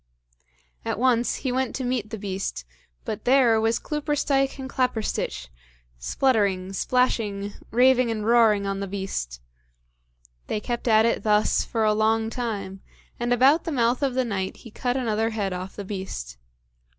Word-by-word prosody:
At - - -2
once 245 0 +2
he 260 - -3
went 260 0 -1
to 265 - -3
meet 245 -4 -2
the 220 - -5
beast, 190 - -4 0.4
but 215 - -4
there 245 -4 +4
was 225 +1 +2
Cloopersteich 290 -3 0
and 265 -1 -6
Claperstich, 225 - -2 0.5
spluttering, 195 - +1
splashing, 205 -3 0 0.2
raving, 255 +1 +4
and 215 -2 -2
roaring 225 -3 +4
on 195 0 -2
the 200 - -3
beast! 185 - -4 1.1
They 215 - -1
kept 240 +2 -4
at 220 -1 +5
it 230 - +1
thus 210 0 +2
for 225 -2 -1
a 215 0 +3
long 220 +1 +1
time, 200 -6 -4 0.4
and 240 0 -1
about 265 +6 +5
the 330 - -3
mouth 245 -2 +1
of 270 -3 0
the 260 -1 +1
night 190 -4 -3
he 230 - -10
cut 245 +3 -1
another 225 -3 0
head 205 -4 -2
off 185 +1 -6
the 205 - -6
beast. 185 - -6
225 Hz, 160 wpm, -25 LUFS, 200-250 Hz, 1.1 s, at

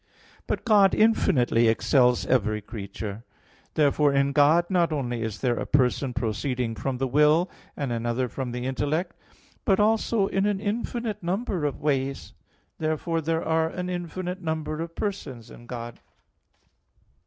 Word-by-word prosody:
But - - -2
God 205 -4 +5
infinitely 125 - +3
excels 125 +2 +3
every 110 -4 +1
creature. 105 0 -7 0.5
Therefore 145 -1 +3
in 140 0 +2
God 150 +5 +4
not 175 -3 +2
only 125 -6 -2
is 110 -2 -4
there 120 -3 +1
a - - -3
person 130 0 +2
proceeding 120 +1 -1
from 130 +3 -3
the 135 - 0
will, 150 +6 +3 0.3
and 140 -4 -2
another 120 +2 -1
from 125 0 -5
the 125 +1 -4
intellect, 145 +6 -1 0.5
but 195 -2 +2
also 215 0 +2
in 195 +1 0
an 205 -2 0
infinite 225 +1 -3
number 185 -1 -2
of 145 - -3
ways. 135 -2 -1 0.5
Therefore 160 +1 -1
there 160 +1 -1
are 160 0 +2
an 180 +1 -4
infinite 180 +1 -4
number 160 -1 -3
of 165 0 -6
persons 135 - -5
in 120 - -13
God. 120 -1 -7
145 Hz, 145 wpm, -26 LUFS, 125-175 Hz, 0.5 s, God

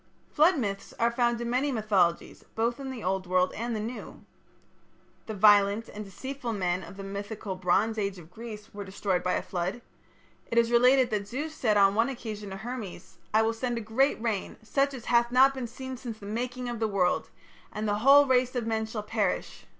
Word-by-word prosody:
Flood 320 +3 +4
myths 200 -6 -4
are 235 +1 +2
found 240 -1 +1
in 235 - -3
many 270 +4 +1
mythologies 200 -7 0
both 235 +3 0
in 270 -1 -5
the 255 -4 -6
Old 185 0 -1
World 185 0 +2
and 235 +1 -3
the - - -2
New. 230 +4 -7 1.0
The 220 - -4
violent 205 +1 +5
and 210 - -7
deceitful 245 +4 -5
men 180 -3 -1
of 180 +2 -11
the 195 - -7
mythical 200 0 -5
Bronze 195 +5 +1
Age 200 -2 -2
of 170 -1 -13
Greece 215 0 -9
were 205 0 -6
destroyed 190 -1 -1
by 180 0 0
a - - -1
flood. 180 +5 -3 0.7
It 230 - -2
is 235 0 +4
related 250 +2 +5
that 205 -2 -1
Zeus 295 +8 -4
said 220 -8 +1
on 195 -1 +5
one 230 +4 +2
occasion 215 -5 -6
to 190 - -6
Hermes: 195 -6 -7
"I 220 +1 +4
will 225 +1 +1
send 240 +1 -2
a - - -3
great 230 +6 +1
rain, 220 -4 -2
such 275 +4 0
as 240 - -9
hath 235 0 +3
not 265 +2 +6
been 260 -3 -4
since 260 +1 -8
the 225 -5 -7
making 245 +4 -3
of 240 -2 -4
the 220 - +1
world, 190 -3 +1 0.4
and 215 +1 -3
the 205 0 0
whole 280 +4 +7
race 255 -1 +2
of 240 -2 -1
men 220 -1 -1
shall 220 -1 -5
perish. 210 -3 -2
220 Hz, 205 wpm, -28 LUFS, 200-245 Hz, 1.0 s, whole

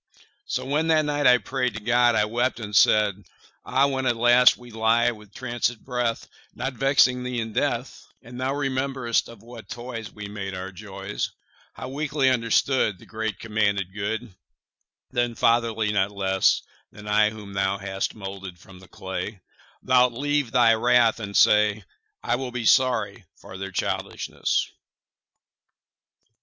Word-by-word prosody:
So - - -2
when 150 +4 0
that 155 -1 +3
night 145 -1 +1
I 125 0 +7
pray'd 125 -1 -2
To - - -4
God, 120 +2 +3
I 105 -1 +3
wept, 120 +3 -1
and 105 -2 -6
said: 105 -1 +4 0.4
Ah, 135 +1 +2
when 130 -2 -1
at 120 -2 +1
last 120 +2 +6
we 120 -1 -14
lie 115 +2 +2
with 105 -3 -14
trancèd 120 -1 -2
breath, 125 -3 -2 0.3
Not 135 +1 -3
vexing 130 -1 +3
Thee 125 -1 -3
in 110 -1 -4
death, 125 0 -2
25 - - -35
And 125 +1 -7
Thou 135 +2 -1
rememberest 130 -3 -1
of 115 -3 -14
what 115 -1 -12
toys 120 -3 -7
We 105 -1 -8
made 100 -2 -6
our 95 +1 -6
joys, 100 +1 -5 0.4
How - - -8
weakly 140 -1 0
understood 115 -2 +1
Thy - - -16
great 110 0 -4
commanded 100 -4 -1
good, 105 +2 -4 0.8
Then, 120 -1 0
fatherly 115 -2 +1
not 95 -1 +1
less 95 -2 +1 0.3
30 - - -19
Than - - -11
I 105 0 +4
whom 105 -2 -10
Thou 95 0 0
hast 95 0 -4
moulded 95 -3 -8
from 90 +2 -16
the 95 - -16
clay, 95 +2 -6 0.4
Thou'lt 125 -1 +4
leave 145 +1 0
Thy 120 -2 +5
wrath, 120 0 +3
and 100 -2 -3
say, 105 0 +4 0.4
'I 120 - 0
will 130 -1 -5
be 120 -2 -4
sorry 130 +2 +2
for 95 - -13
their 95 0 -5
childishness. - - -2
115 Hz, 160 wpm, -24 LUFS, 105-125 Hz, 0.8 s, I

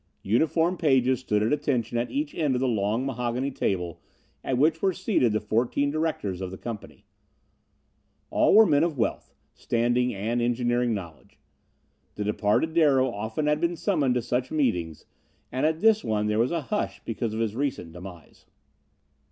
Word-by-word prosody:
Uniformed 160 - +1
pages 130 -4 +3
stood 105 -5 0
at 110 - +1
attention 125 -6 -1
at 120 +1 0
each 290 +1 -3
end 150 -5 0
of - - 0
the 130 - +1
long, 110 +2 0
mahogany 125 +1 -2
table 90 -9 -2 0.4
at 130 - -1
which 155 +4 +2
were 190 -1 +2
seated 185 - +1
the 110 - +1
fourteen 120 +7 0
directors 150 - -2
of 95 - -3
the 95 - -8
company. 115 -1 -8 1.3
All - - +4
were 220 +1 +9
men 145 -4 +3
of 165 -4 -1
wealth, 115 - -2 0.2
standing 120 +2 0
and 115 +3 -2
engineering 120 0 +1
knowledge. 85 -6 -10 0.8
The 105 - -3
departed 105 +9 +1
Darrow 135 -6 +3
often 110 +7 -3
had 150 +1 +1
been 170 0 +1
summoned 150 -8 +1
to 125 - 0
such 125 +2 -1
meetings, 90 - -1 0.5
and 130 +4 +1
at 160 +1 -2
this 220 -1 +4
one 105 -1 0
there 105 +1 0
was 120 +2 +2
a 170 -1 -1
hush 210 +9 -2
because 115 -1 -3
of - - -3
his 110 -2 -1
recent 130 - -3
demise. 90 -1 -12
125 Hz, 170 wpm, -26 LUFS, 110-150 Hz, 1.3 s, were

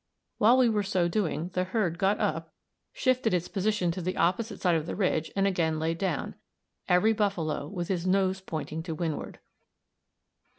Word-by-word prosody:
While 230 +4 +6
we 255 -2 +5
were 215 -2 +2
so 190 -3 +1
doing, 175 -3 -1
the 185 - +1
herd 185 -3 -1
got 195 +1 +2
up, 160 0 -2 0.4
shifted 255 -6 +1
its 175 0 -1
position 200 -3 0
to 180 - -5
the 185 +2 -3
opposite 205 +6 0
side 180 -2 +2
of 160 -1 0
the - - -3
ridge, 165 -5 0
and 195 0 +2
again 165 -5 +1
laid 165 +1 -1
down, 180 -7 -2 0.6
every 180 +5 +4
buffalo 175 -9 -1
with 175 0 -4
his 180 -2 -1
nose 190 0 +2
pointing 160 -3 -5
to 160 -1 -5
windward. 160 -2 -4
185 Hz, 175 wpm, -28 LUFS, 165-200 Hz, 0.6 s, While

